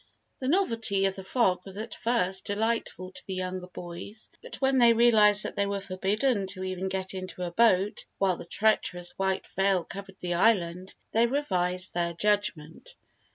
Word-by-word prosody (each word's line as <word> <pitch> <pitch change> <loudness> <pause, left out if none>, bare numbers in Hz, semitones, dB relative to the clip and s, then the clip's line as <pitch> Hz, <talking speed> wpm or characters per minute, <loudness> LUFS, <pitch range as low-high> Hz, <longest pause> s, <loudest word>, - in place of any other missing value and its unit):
The 255 - -3
novelty 230 - +2
of 195 0 0
the 190 - -8
fog 190 -3 +2
was 195 0 -8
at 220 +2 -5
first 195 -6 0
delightful 205 -3 -2
to - - -9
the 190 - -3
younger 185 0 -4
boys 180 +5 -8
but - - -10
when 265 -1 +3
they 235 -1 +7
realised 215 -3 +5
that - - -5
they 200 0 +1
were 200 0 -2
forbidden 195 +3 0
to 185 0 -6
even 185 0 -3
get 190 0 -3
into 185 -1 -6
a 175 - -3
boat 205 -1 +3
while 190 -3 +1
the - - -9
treacherous 180 -3 +1
white 190 0 0
veil 195 -2 +2
covered 195 +2 -9
the 175 -1 -2
island, 180 -2 +1 0.2
they 230 +1 +3
revised 185 -9 0
their 170 -1 -1
judgment. 205 - -2
195 Hz, 175 wpm, -28 LUFS, 185-220 Hz, 0.2 s, they